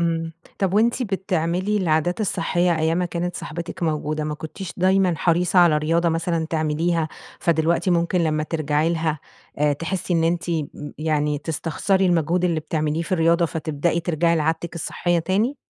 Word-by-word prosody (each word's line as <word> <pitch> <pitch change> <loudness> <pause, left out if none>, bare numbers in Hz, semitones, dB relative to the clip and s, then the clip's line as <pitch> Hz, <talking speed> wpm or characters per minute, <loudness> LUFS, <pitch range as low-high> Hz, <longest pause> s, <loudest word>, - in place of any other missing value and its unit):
امم، 165 -1 -1 0.3
طب 195 -1 0
وأنتِ 235 +4 +3
بتعملي 190 -1 -1
العادات 175 0 +1
الصحية 175 -4 +1
أيّام 160 +2 +1
ما 180 - +1
كانت 175 0 -3
صاحبتك 170 +3 -6
موجودة، 155 -1 -1
ما 150 - -2
كنتيش 165 +4 -7
دايمًا 185 -1 +3
حريصة 175 +3 +2
على 170 -4 +6
رياضة 165 +3 +1
مثلًا 165 0 -1
تعمليها؟ 160 +1 0 0.3
فدلوقتي 170 +2 +1
ممكن 170 +1 +2
لمّا 155 -2 +1
ترجعي 155 0 0
لها 160 -2 -1 0.4
آآ، 150 0 +3
تحسّي 175 +4 -2
إن 165 -1 +2
أنتِ 175 +1 0
م 160 -3 0 0.3
يعني 150 -1 0
تستخسري 170 +5 0
المجهود 175 +1 +1
اللي 165 -3 +1
بتعمليه 155 +1 -1
في 185 - -6
الرياضة 170 0 +3
فتبدأي 160 +1 -1
ترجعي 170 0 +1
لعادتك 160 +2 -1
الصحية 175 +1 -1
تاني؟ 205 - 0
170 Hz, 155 wpm, -22 LUFS, 155-180 Hz, 0.4 s, على